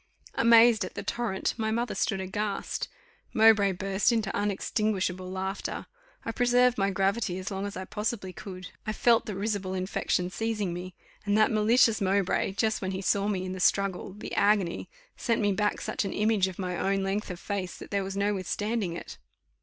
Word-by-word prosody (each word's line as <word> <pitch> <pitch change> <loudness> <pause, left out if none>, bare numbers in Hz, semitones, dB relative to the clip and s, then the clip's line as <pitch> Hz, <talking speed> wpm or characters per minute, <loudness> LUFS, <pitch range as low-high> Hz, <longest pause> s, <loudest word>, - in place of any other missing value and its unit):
Amazed 230 -1 +6
at - - -7
the - - -4
torrent, 225 -6 -1
my 220 -1 -1
mother 235 +2 -1
stood 195 -3 0
aghast; 200 +2 -3 0.5
Mowbray 215 -3 +6
burst 195 +4 +1
into 220 -4 0
unextinguishable 195 -2 -1
laughter: 190 +1 -4 0.4
I 230 - -1
preserved 245 0 +3
my 195 0 +2
gravity 195 0 0
as 185 +2 -5
long 195 +1 -3
as 200 - -7
I 185 - -5
possibly 210 -2 -3
could; 185 -2 -8 0.2
I 215 - 0
felt 230 +1 +3
the 210 - -4
risible 200 -2 -2
infection 185 -1 -1
seizing 210 -4 -2
me, 180 +1 -7 0.3
and 205 0 +1
that 215 - +4
malicious 220 +1 +4
Mowbray, 195 0 +1
just 220 +2 0
when 190 0 -2
he 190 - -3
saw 200 +2 +2
me 190 -3 -1
in 185 - -4
the 185 - -5
struggle 195 0 +1
the 210 - -8
agony 200 -4 +2 0.3
sent 230 -2 0
me 205 -2 +2
back 210 +2 0
such - - -2
an 195 - -3
image 210 -2 +2
of 185 - -7
my 180 -2 -3
own 195 0 +1
length 195 +2 -2
of 180 -1 -6
face, 195 -3 -4
that - - -11
there 200 -1 0
was 195 +1 -5
no 205 +1 +1
withstanding 205 0 -2
it. - - -9
200 Hz, 190 wpm, -28 LUFS, 190-215 Hz, 0.5 s, Amazed